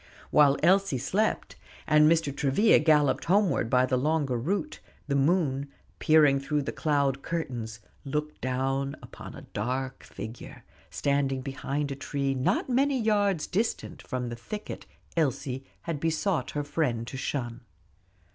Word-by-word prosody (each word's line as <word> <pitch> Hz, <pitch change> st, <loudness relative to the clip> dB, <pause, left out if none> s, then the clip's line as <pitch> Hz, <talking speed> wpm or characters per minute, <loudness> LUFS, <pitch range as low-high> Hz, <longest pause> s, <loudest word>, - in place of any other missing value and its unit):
While 145 Hz, -2 st, +5 dB
Elsie 190 Hz, -4 st, +4 dB
slept, 200 Hz, -, -1 dB, 0.3 s
and 150 Hz, 0 st, +5 dB
Mr. 160 Hz, -4 st, +1 dB
Travilla 145 Hz, +12 st, +4 dB
galloped 150 Hz, -3 st, +3 dB
homeward 185 Hz, -, +2 dB
by 125 Hz, +1 st, +4 dB
the 130 Hz, 0 st, 0 dB
longer 145 Hz, -2 st, +1 dB
route, 195 Hz, -, -2 dB, 0.3 s
the 140 Hz, -, -1 dB
moon, 140 Hz, -2 st, +1 dB, 0.3 s
peering 150 Hz, -3 st, +5 dB
through 145 Hz, +1 st, -1 dB
the -, -, -3 dB
cloud 140 Hz, -3 st, 0 dB
curtains, 120 Hz, -10 st, -4 dB, 0.2 s
looked 150 Hz, +2 st, -4 dB
down 135 Hz, +2 st, -1 dB
upon -, -, -10 dB
a -, -, -10 dB
dark 130 Hz, +5 st, -3 dB
figure, 110 Hz, +2 st, -9 dB, 0.3 s
standing 140 Hz, -2 st, 0 dB
behind 140 Hz, +2 st, -3 dB
a -, -, -3 dB
tree 140 Hz, 0 st, -2 dB
not 130 Hz, 0 st, 0 dB
many 270 Hz, +1 st, +2 dB
yards 205 Hz, -6 st, +1 dB
distant 220 Hz, +5 st, -2 dB
from 125 Hz, -2 st, -4 dB
the 120 Hz, -, -5 dB
thicket 210 Hz, -, -7 dB, 0.3 s
Elsie 135 Hz, -4 st, -1 dB, 0.2 s
had 165 Hz, -4 st, -4 dB
besought 165 Hz, -2 st, 0 dB
her 145 Hz, -, 0 dB
friend 130 Hz, -6 st, -1 dB
to 125 Hz, -, -8 dB
shun. 125 Hz, -2 st, -3 dB
140 Hz, 140 wpm, -28 LUFS, 130-165 Hz, 0.3 s, While